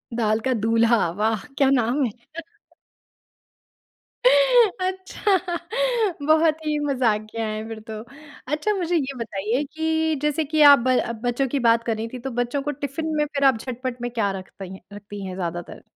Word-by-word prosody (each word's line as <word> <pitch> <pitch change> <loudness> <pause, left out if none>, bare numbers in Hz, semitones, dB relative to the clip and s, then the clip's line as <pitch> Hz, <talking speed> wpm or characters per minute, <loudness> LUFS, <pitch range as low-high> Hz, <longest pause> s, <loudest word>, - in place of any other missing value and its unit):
दाल 215 -1 +1
का 260 - +2
दूल्हा, 225 -3 +2
वाह! 215 +2 -1
क्या 275 -1 +4
नाम 260 +2 +2
है? 225 - -2 2.1
अच्छा, 415 -6 +3 0.9
बहुत 315 0 +4
ही 300 -1 0
मजाकियाँ 225 -4 0
है 215 +1 -4
फिर 225 -1 -7
तो। 215 0 -5 0.5
अच्छा 420 +8 0
मुझे 355 -3 -1
ये 275 -3 0
बताइए 225 +4 -2
कि 320 0 0
जैसे 300 +1 0
कि 310 +1 0
आप 280 - +7
ब 255 - +4 0.3
बच्चों 245 +3 0
की 275 +2 -1
बात 230 0 +3
कर 225 -1 -1
रहीं 225 +1 -3
थी, 250 - -5
तो 265 +2 -5
बच्चों 245 +4 -2
को 295 +1 -2
टिफिन 290 +3 -4
में 300 - +2
फिर 280 -1 -3
आप 265 -4 +5
झटपट 250 +1 -5
में 245 - -2
क्या 210 -4 0
रख 185 - -14
तई 190 0 -7 0.2
रखती 205 -1 -8
हैं 185 -1 -6
ज्यादातर? 175 -1 -5
255 Hz, 165 wpm, -23 LUFS, 220-305 Hz, 2.1 s, आप